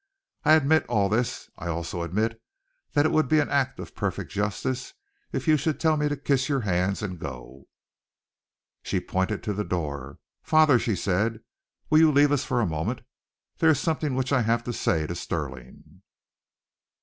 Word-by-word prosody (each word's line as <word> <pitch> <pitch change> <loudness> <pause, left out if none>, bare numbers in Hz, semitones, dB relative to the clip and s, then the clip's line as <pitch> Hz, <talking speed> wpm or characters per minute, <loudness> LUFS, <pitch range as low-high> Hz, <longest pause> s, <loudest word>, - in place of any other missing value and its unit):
I 155 - +6
admit 155 0 +4
all 105 -4 +1
this. 120 +3 -1
I 85 - -5
also 85 +1 -3
admit 110 +7 -1 0.5
that 145 -1 +3
it - - +2
would 155 -3 +2
be 155 - +3
an 150 - +1
act 135 -1 0
of - - -8
perfect - - -3
justice 105 - -2 0.4
if - - -3
you 155 -1 +5
should 150 +2 -1
tell 160 -1 +3
me 150 -1 0
to 145 - -2
kiss 135 -1 0
your 140 -2 +1
hands 95 0 0
and 90 -4 -4
go." 65 -1 -9 1.1
She - - -1
pointed 95 +3 -2
to 105 - -2
the 105 +1 -2
door. 70 -8 -4 0.2
"Father," 155 -5 +5
she 110 -3 0
said, 105 +5 0 0.5
"will 155 - +6
you 160 -1 +6
leave 145 0 +4
us 145 -2 +2
for 120 - 0
a - - +2
moment? 85 +9 -2 0.6
There 160 - +5
is 150 -4 +4
something 155 -4 -1
which 130 +1 -1
I 135 - +4
have 115 +1 +1
to 120 - -4
say 80 -7 0
to 85 - -4
Stirling." 65 -7 -6
115 Hz, 185 wpm, -26 LUFS, 90-145 Hz, 1.1 s, I